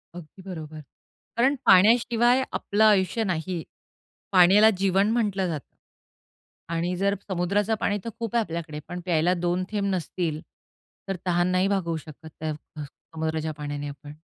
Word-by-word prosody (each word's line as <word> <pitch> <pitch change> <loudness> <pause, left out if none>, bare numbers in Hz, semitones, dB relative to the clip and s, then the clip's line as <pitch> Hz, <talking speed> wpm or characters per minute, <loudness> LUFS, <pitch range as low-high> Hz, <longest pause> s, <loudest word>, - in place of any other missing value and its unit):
अगदी 175 +2 -11
बरोबर, 155 -3 -7 0.6
कारण 265 +4 +3
पाण्याशिवाय 235 +5 +5
आपलं 210 +2 0
आयुष्य 210 +1 +3
नाही. 175 -2 -2 0.7
पाण्याला 195 +4 +7
जीवन 195 +2 +2
म्हटलं 205 -5 0
जातं. 155 -4 -6 1.0
आणि 175 +2 -1
जर 200 +2 +1
समुद्राचं 200 +4 0
पाणी 205 0 0
तर 230 - -4
खूप 230 -1 -4
आहे 235 - +4
आपल्याकडे, 165 -2 -6
पण 180 - -5
प्यायला 175 0 +2
दोन 175 +1 -1
थेंब 205 -2 -1
नसतील 165 -2 -3 0.7
तर 195 - -2
तहान 175 0 +2
नाही 185 +1 +2
भागवू 175 -5 -1
शकत 155 0 -12
अ, 155 - -1 0.3
समुद्राच्या 160 +2 -5
पाण्याने 145 0 -4
आपण. 145 +1 -10
180 Hz, 140 wpm, -25 LUFS, 160-205 Hz, 1.0 s, पाण्याला